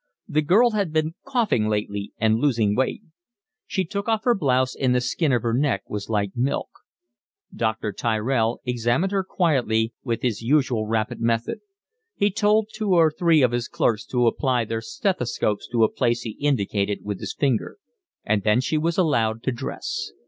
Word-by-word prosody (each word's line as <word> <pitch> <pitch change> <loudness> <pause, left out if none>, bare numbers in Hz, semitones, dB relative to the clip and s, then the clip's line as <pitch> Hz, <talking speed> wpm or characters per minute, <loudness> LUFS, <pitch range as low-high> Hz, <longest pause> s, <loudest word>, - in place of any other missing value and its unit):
The 155 - +1
girl 215 +11 +4
had 200 -6 -1
been 155 0 0
coughing 230 - +1
lately 105 -1 -2
and 110 0 +2
losing 115 -7 +2
weight. 130 +2 -1 0.6
She 190 -2 -1
took 200 +5 -4
off 220 -1 +1
her 245 - +4
blouse 130 - +1
and 130 -2 +1
the - - +4
skin 135 +5 0
of 120 -3 +1
her 115 -1 0
neck 125 -6 0
was 105 0 -4
like 100 -3 -1
milk. 125 +3 -1 0.9
Dr. 110 -2 -1
Tyrell 115 +2 0
examined 125 +9 0
her 195 -1 +1
quietly, 125 - +1
with 115 -3 -2
his 120 -5 -1
usual 120 -4 +1
rapid 115 +2 -1
method; 115 0 0 0.6
he 205 0 +2
told 210 +1 +2
two 215 -3 0
or 165 -2 +5
three 160 -2 +3
of 125 - +3
his 120 0 -2
clerks 110 -2 0
to 125 -1 +1
apply 125 0 +1
their 115 +1 -3
stethoscopes 125 - -1
to 120 -1 +1
a 110 - +2
place 120 -1 +1
he 115 - -4
indicated 105 -7 0
with 100 -2 -4
his - - -5
finger; 135 - 0 0.5
and 105 -1 +1
then 105 +4 +3
she 155 +4 0
was 165 +2 -1
allowed 115 - +1
to 130 - 0
dress. 120 - -5
125 Hz, 180 wpm, -23 LUFS, 110-155 Hz, 0.9 s, or